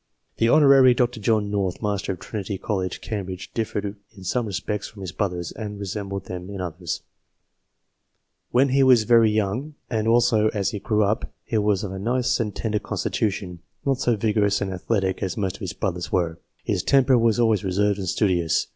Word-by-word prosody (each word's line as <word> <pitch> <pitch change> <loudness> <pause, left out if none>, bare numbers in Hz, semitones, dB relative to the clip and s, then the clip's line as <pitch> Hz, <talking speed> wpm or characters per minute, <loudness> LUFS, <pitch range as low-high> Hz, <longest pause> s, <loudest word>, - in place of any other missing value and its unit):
The 115 - +3
Hon. 135 -3 +7
Dr. 120 -1 0
John 105 -1 +1
North, 95 -3 -1
Master 100 -2 -1
of - - -9
Trinity 100 -2 -5
College, 95 -3 -3
Cambridge, 95 -4 -5
differed 105 -2 -3 0.2
in 95 - -11
some 115 +5 -1
respects 105 +2 -3
from 105 - -13
his 90 - -5
brothers, 90 -4 -2
and 105 -2 -6
resembled 100 -1 -4
them 90 +1 -7
in 100 -1 -6
others: 85 -1 -4 0.8
" - - -52
When 135 +3 +4
he 135 +2 +3
was 130 -4 +6
very 115 -1 +5
young, 110 +8 -1 0.2
and 110 -1 0
also 115 -2 +4
as 100 -2 0
he 105 - -4
grew 105 +1 +1
up, 105 +2 -1
he 110 - 0
was 105 -2 +1
of 100 - -4
a 95 - -5
nice 120 +5 +1
and 105 -3 -2
tender 105 -2 -1
constitution 95 -6 -2 0.3
not 135 -2 +1
so 120 - +2
vigorous 105 -1 +1
and 100 -1 -2
athletic 95 0 -1
as 95 -3 -2
most 100 -2 -2
of - - -24
his 95 -4 -4
brothers 90 -7 -3
were." 85 -2 0
" - - -41
His - - 0
temper 135 -2 +4
was 115 -1 +3
always 110 -5 +3
reserved 100 +2 +1
and 95 -3 -2
studious. 85 -5 +1
105 Hz, 195 wpm, -24 LUFS, 95-115 Hz, 0.8 s, Hon